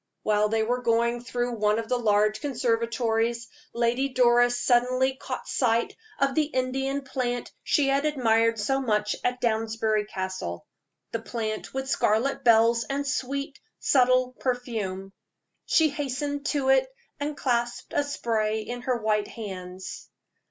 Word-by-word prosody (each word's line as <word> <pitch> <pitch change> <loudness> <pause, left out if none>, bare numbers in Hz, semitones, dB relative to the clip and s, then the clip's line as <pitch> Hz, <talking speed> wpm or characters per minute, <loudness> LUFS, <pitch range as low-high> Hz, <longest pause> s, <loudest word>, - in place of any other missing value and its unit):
While 210 0 +2
they 220 0 +1
were 245 +3 -1
going 235 0 +1
through 245 -2 -2
one 210 0 +2
of 225 -1 -3
the 250 +1 0
large 215 -1 +2
conservatories, 235 -3 0 0.2
Lady 240 +3 +1
Doris 245 -1 +4
suddenly 255 +1 +2
caught 265 - -6
sight 235 -3 +1 0.2
of 275 -1 +1
the 310 0 +2
Indian 270 0 -2
plant 250 -2 -3
she 290 -3 +2
had 275 +1 +2
admired 230 -6 +2
so 270 +6 0
much 210 -4 0
at 250 0 0
Downsbury 220 -2 0
Castle 185 - -5 0.5
the 230 - -3
plant 220 -2 -4
with 265 0 -2
scarlet 245 +1 +1
bells 230 0 +5
and 280 +1 -2
sweet, 280 +1 -3 0.2
subtle 255 -1 +3
perfume. 215 -7 -3 0.5
She 320 -1 +4
hastened 285 0 -3
to 275 -3 0
it, 265 0 +4 0.3
and 290 0 -3
clasped 240 -2 -1
a 290 - +2
spray 220 -6 -1
in 245 +3 -6
her 250 0 0
white 215 -2 0
hands. 185 -3 -8
240 Hz, 140 wpm, -26 LUFS, 220-265 Hz, 0.5 s, bells